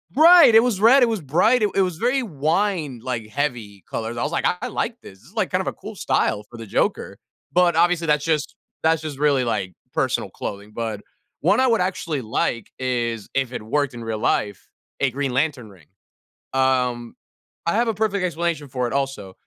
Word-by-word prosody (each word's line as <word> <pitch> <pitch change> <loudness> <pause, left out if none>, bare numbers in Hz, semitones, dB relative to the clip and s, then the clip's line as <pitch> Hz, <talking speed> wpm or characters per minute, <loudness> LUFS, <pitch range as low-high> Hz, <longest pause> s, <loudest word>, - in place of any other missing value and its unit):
Right. 325 -6 +8
It 225 - +8
was 215 -6 0
red. 250 +4 +7
It 235 - +3
was 220 -6 -2
bright. 195 - +3
It 210 - +3
it 195 - +4
was 180 -4 -1
very 250 +4 +1
wine, 160 - -1
like, 120 -4 -3
heavy 115 -7 -3
colors. 115 +1 -4
I 120 - -1
was 150 - -2
like, 170 - -1 0.2
"I 250 - -2
like 235 0 -3
this. 95 0 -13
This - - -21
is - - -22 0.2
kind - - +1
of - - -6
a - - -1
cool - - -10
style 105 - 0
for 120 - -11
the 115 - -8
Joker." - - -1 0.3
But, 175 -2 +3
obviously, 170 0 +2
that's 150 0 +2
just 155 -3 -1 0.3
that's 160 0 +3
just 150 -3 -6
really, 140 -3 +3
like, 100 -6 -2 0.2
personal - - 0
clothing. 100 +1 -7
But 110 -3 -4 0.4
one - - +3
I 260 - +4
would 225 -5 +2
actually 170 -6 -2
like 110 0 -2
is, 120 -4 -2
if 130 -2 0
it - - -4
worked 140 +4 -1
in 120 -1 -8
real 110 -1 -3
life, 100 -3 -1 0.3
a 135 - +2
green 135 0 -2
lantern 130 -4 -1
ring. 85 -6 -19 0.7
Um, 125 -3 0 0.5
I 170 - +1
have 235 +1 +2
a - - +1
perfect 205 -2 -1
explanation 170 -3 -2
for 125 -1 -1
it - - -5
also. 135 -9 -3
145 Hz, 205 wpm, -22 LUFS, 120-180 Hz, 0.7 s, Right